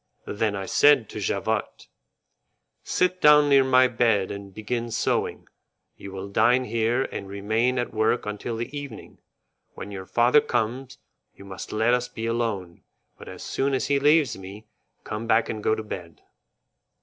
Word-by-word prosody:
Then 105 0 -1
I 95 -1 -4
said 140 -1 +4
to - - -7
Javotte: 100 - -2 1.0
"Sit 180 0 0
down 150 -1 +6
near 140 -1 +6
my 130 -1 +5
bed 115 -6 +1
and 100 -1 -8
begin 115 +4 -4
sewing. 115 0 -1 0.5
You 100 - -10
will 95 +1 -6
dine 125 +5 +3
here 115 +2 0
and 100 - -6
remain 110 +6 0
at 120 - -2
work 110 +2 +1
until 105 +2 -4
the 120 +5 -5
evening. 140 -6 -9 0.6
When 100 - -8
your 95 -2 -7
father 120 +5 +4
comes, 130 +4 -3 0.4
you 100 - -14
must 95 -1 -8
let 110 +3 +2
us 125 0 0
be 115 -2 -6
alone, 110 -7 -3 0.4
but - - -12
as - - -9
soon 135 0 -1
as 130 - -1
he 140 -1 +3
leaves 145 -3 +3
me, 100 +3 -11 0.4
come 110 +2 -5
back 110 0 +2
and 110 -1 -4
go 110 - +1
to 110 - -6
bed." 85 -6 -9
115 Hz, 165 wpm, -25 LUFS, 105-130 Hz, 1.0 s, down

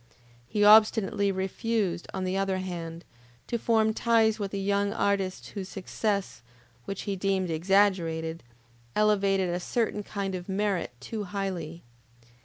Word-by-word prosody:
He 210 - +1
obstinately 210 -1 +5
refused, 190 -1 -1
on 190 - -3
the 185 0 -1
other 195 -1 0
hand, 170 -2 -6 0.4
to 235 - -2
form 220 -1 +2
ties 225 -1 +3
with 200 -1 -2
the 200 - -4
young 200 +1 +1
artists 200 -3 -1
whose 190 -2 -6
success, 195 - -2 0.4
which 195 - -5
he 200 - -2
deemed 190 -2 0
exaggerated, 165 -2 +1 0.5
elevated 200 -3 +2
a 175 - -1
certain 220 +2 -1
kind 200 -1 -4
of 180 +1 -6
merit 195 -5 0
too 210 - -5
highly. 180 -4 -4
195 Hz, 135 wpm, -28 LUFS, 185-210 Hz, 0.5 s, obstinately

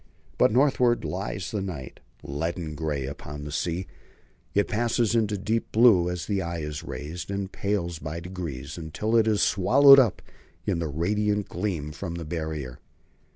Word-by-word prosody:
But - - +5
northward 125 -1 +3
lies 90 -1 -4
the 105 - -2
night. 80 -9 -6 0.2
Leaden 80 +3 -3
grey 75 -3 -2
upon 75 +1 -7
the 75 - -6
sea, 85 +4 -2 0.7
it 100 - +3
passes 115 0 +1
into 105 -3 +1
deep 110 +4 -2
blue 110 -7 +5
as 90 -1 -4
the 100 -2 -1
eye 85 -1 -3
is 75 -1 -4
raised, 75 +7 -6
and 100 -1 -3
pales 85 -5 -2
by 80 +2 -5
degrees 85 -7 -6
until 85 +8 -2
it 110 -1 +4
is 105 -2 +3
swallowed 135 +8 +7
up 120 -7 +2 0.4
in - - 0
the 85 - -1
radiant 105 +7 0
gleam 85 -6 -3
from 85 +2 -5
the 85 -1 -5
Barrier. 80 -5 -4
90 Hz, 160 wpm, -26 LUFS, 80-105 Hz, 0.7 s, swallowed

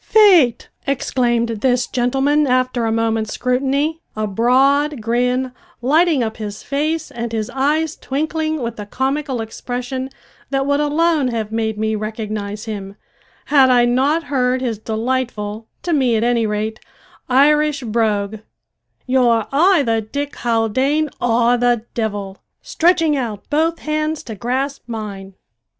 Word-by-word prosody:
"Faith," 355 - +5 0.2
exclaimed 240 -3 0
this 250 -1 +2
gentleman, 270 +4 +1
after 255 -2 +1
a 225 - 0
moment's 225 -1 0
scrutiny, 275 +5 0
a 215 0 -1
broad 270 +7 +2
grin 250 +3 0 0.3
lighting 300 +2 +3
up 220 -1 -4
his 210 -2 -6
face 310 +3 -2
and 235 -1 -4
his 215 -1 -2
eyes 305 +4 0
twinkling 310 +1 -2
with 235 -1 -4
a 205 - -6
comical 265 +1 -2
expression 250 +3 -5 0.4
that 270 -1 0
would 285 0 +1
alone 300 -1 +2
have 225 -3 -3
made 220 -1 -1
me 220 +1 0
recognise 215 0 -4
him, 200 -3 -6 0.5
had 275 -3 +5
I 245 -1 +5
not 270 +7 +2
heard 255 -3 0
his 235 -5 -2
delightful, 220 -1 -3 0.2
to 345 - -1
me 260 -6 +2
at 220 - +1
any 235 -2 +2
rate, 215 +1 -2 0.5
Irish 290 +2 +3
brogue, 215 -2 0 0.7
"ye're 245 -4 +3
ayther 285 - +3
Dick 280 +7 -5
Haldane 260 +6 +1
or 240 0 +3
the 240 -2 +1
divvle!" 205 -4 -3 0.2
stretching 330 -2 +2
out 225 -7 -4
both 325 +3 +1
hands 310 0 -2
to 230 - -7
grasp 260 +6 -2
mine. 200 -4 -6
250 Hz, 135 wpm, -19 LUFS, 225-285 Hz, 0.7 s, Faith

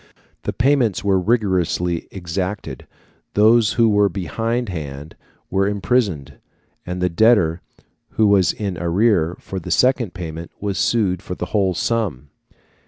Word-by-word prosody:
The - - 0
payments 125 -5 +1
were 100 -2 +2
rigorously 90 -5 0
exacted; 90 -4 -5 0.5
those 110 +1 +4
who 115 -2 +3
were 105 -1 +3
behind 115 +6 -2
hand 75 -3 -7 0.4
were 95 +1 +2
imprisoned, 95 - -1 0.5
and 90 0 -3
the - - +3
debtor 90 -3 +3 0.5
who 110 - +2
was 100 -3 +4
in 100 -5 -4
arrear 90 -1 +1
for 95 - -6
the 85 - -8
second 125 -6 +2
payment 85 -2 -6
was 100 -2 -3
sued 100 -7 +1
for 90 - -6
the - - -4
whole 95 -4 +2
sum. 85 - -2
95 Hz, 135 wpm, -20 LUFS, 85-110 Hz, 0.5 s, those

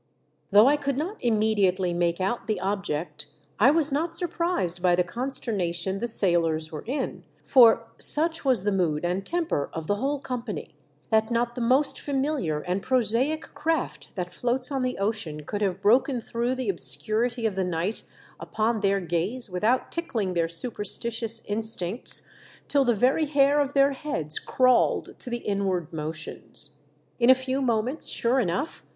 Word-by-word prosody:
Though 210 +2 +6
I 290 +3 +4
could 280 -2 -2
not 360 +9 -3
immediately 205 -5 +1
make 170 0 0
out 195 +6 -2
the 215 -4 -1
object, 190 -4 -3 0.3
I - - +6
was 305 -1 +2
not 325 +4 -1
surprised 335 - -2
by 180 -1 +3
the 180 - +2
con 240 +9 -4
sternation 190 -6 -1
the 240 - -2
sailors 165 -7 +2
were 155 - -7
in; 265 +2 -3 0.2
for, 230 -3 +5
such 325 +2 +4
was 255 -8 +2
the 205 - +1
mood 175 -5 0
and 180 +3 -1
temper 330 - -2
of 160 -1 -5
the 205 +5 0
whole 280 +5 -1
company, 250 -5 -6 0.4
that 220 0 +2
not 235 0 0
the 245 - -5
most 270 +4 +2
familiar 270 - -2
and 185 +3 -2
prosaic 255 +5 0
craft 320 -2 -2
that 180 -2 -5
floats 250 +5 -1
on 270 -1 -1
the 255 0 -2
ocean 195 -7 -3
could 205 +7 -5
have 195 -1 -1
broken 245 +4 +3
through 235 +2 -2
the 255 -4 -3
obscurity 225 +5 0
of 220 - +1
the 190 0 -1
night 180 +4 -2 0.4
upon 220 +1 -1
their 200 -1 +1
gaze 180 +8 -2
v/ithout 215 +8 0
tickling 230 - -2
their 170 -1 +1
superstitious 225 +4 0
in 205 +2 -2
stincts, 220 -1 +3 0.4
till 280 -1 +3
the 240 -3 +2
very 260 +8 +2
hair 285 0 +3
of 285 -1 0
their 275 0 +4
heads 215 - -1
crawled 255 -1 +1
to 250 - -7
the 240 0 -4
inward 190 -5 -2
motions. 155 0 -6 0.4
In 240 +1 +4
a 260 - +9
few 260 +1 -3
moments, 245 +3 -1
sure 245 +3 +1
enouci'h. 195 - -3
225 Hz, 170 wpm, -25 LUFS, 185-265 Hz, 0.4 s, a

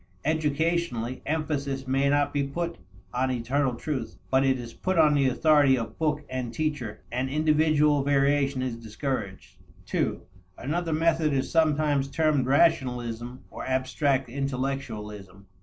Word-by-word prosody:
Educationally, 155 -4 0
emphasis 145 -3 -2
may 135 +2 +2
not 145 0 +2
be 145 - +1
put 170 +3 -3 0.3
on 130 +1 +1
eternal 130 +2 0
truth, 130 -1 -4
but 130 0 +4
it 135 -1 +2
is 120 -1 -8
put 185 -1 -2
on 155 -2 +6
the 140 -2 +3
authority 145 0 +4
of 115 -2 -6
book 150 -2 0
and 130 -2 -4
teacher, 130 -6 -3
and 125 +2 -1
individual 150 0 +3
variation 140 -1 +2
is 125 -3 -2
discouraged. 115 -3 -5 0.4
(ii) - - +1 0.4
Another 165 +6 -2
method 160 -1 +2
is 135 -1 -1
sometimes 150 -3 +2
termed 145 -3 +1
rationalism 125 -5 +1
or - - -7
abstract 130 +1 0
intellectualism. 120 -7 -4
140 Hz, 135 wpm, -27 LUFS, 125-150 Hz, 0.4 s, on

